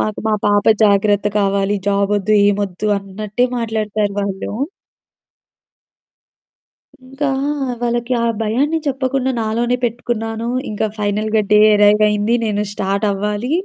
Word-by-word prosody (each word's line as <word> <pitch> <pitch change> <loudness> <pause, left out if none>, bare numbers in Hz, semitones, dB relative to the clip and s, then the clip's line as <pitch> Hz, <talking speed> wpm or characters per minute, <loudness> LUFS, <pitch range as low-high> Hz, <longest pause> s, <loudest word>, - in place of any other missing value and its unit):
మాకు 215 - -2
మా 215 - +2
పాప 205 0 +2 0.2
జాగ్రత్త 205 0 +2
కావాలి. 200 0 +1
జాబొద్దు, 200 +1 +1 0.2
ఏమొద్దు, 200 -1 -2
అన్నట్టే 205 +4 -3
మాట్లాడతారు 215 -3 -2
వాళ్ళు. 195 -1 -4 2.6
ఇంకా 270 +3 -3 0.5
వాళ్ళకి 240 +1 -1
ఆ - - +2 0.2
భయాన్ని 270 +9 0
చెప్పకుండా 265 -1 -1
నాలోనే 235 +3 0
పెట్టుకున్నాను. 230 -1 -3 0.2
ఇంకా 215 0 -1
ఫైనల్‌గా 215 +1 0
డే 210 - +6 0.2
అరైవయింది. 210 +1 +3
నేను 210 -1 -1
స్టార్ట్ 200 +2 -1
అవ్వాలి. 210 +5 -2
210 Hz, 105 wpm, -18 LUFS, 205-235 Hz, 2.6 s, డే